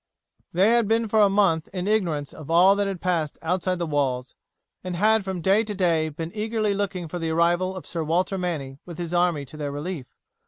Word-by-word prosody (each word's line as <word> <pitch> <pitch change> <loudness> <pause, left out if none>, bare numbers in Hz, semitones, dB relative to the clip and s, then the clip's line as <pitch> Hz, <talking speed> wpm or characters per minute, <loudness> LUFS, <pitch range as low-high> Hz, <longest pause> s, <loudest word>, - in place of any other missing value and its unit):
They 190 +6 +4
had 235 -2 +3
been 225 +1 +2
for 215 +1 +3
a 205 - +6
month 195 -5 +2
in 185 0 -3
ignorance 170 -10 0
of 155 -1 -11
all 180 +4 +6
that 200 0 0
had 195 -2 -4
passed 165 -5 -1
outside 180 +2 0
the 170 - -2
walls, 135 -5 -1 0.5
and 180 -1 -4
had 215 +3 +3
from 190 -2 -4
day 195 +5 +3
to 210 -2 -5
day 165 -4 +1
been 160 +2 -6
eagerly 215 -1 -1
looking 195 -3 -2
for 175 +3 -5
the 165 -1 -2
arrival 175 +3 +1
of 185 - -8
Sir 165 -2 -3
Walter 180 +5 0
Manny 145 -7 -4
with 170 -3 -10
his 175 -1 -4
army 175 -5 +1
to 155 - -10
their 145 -2 -3
relief. 145 -1 -5
180 Hz, 220 wpm, -24 LUFS, 160-195 Hz, 0.5 s, a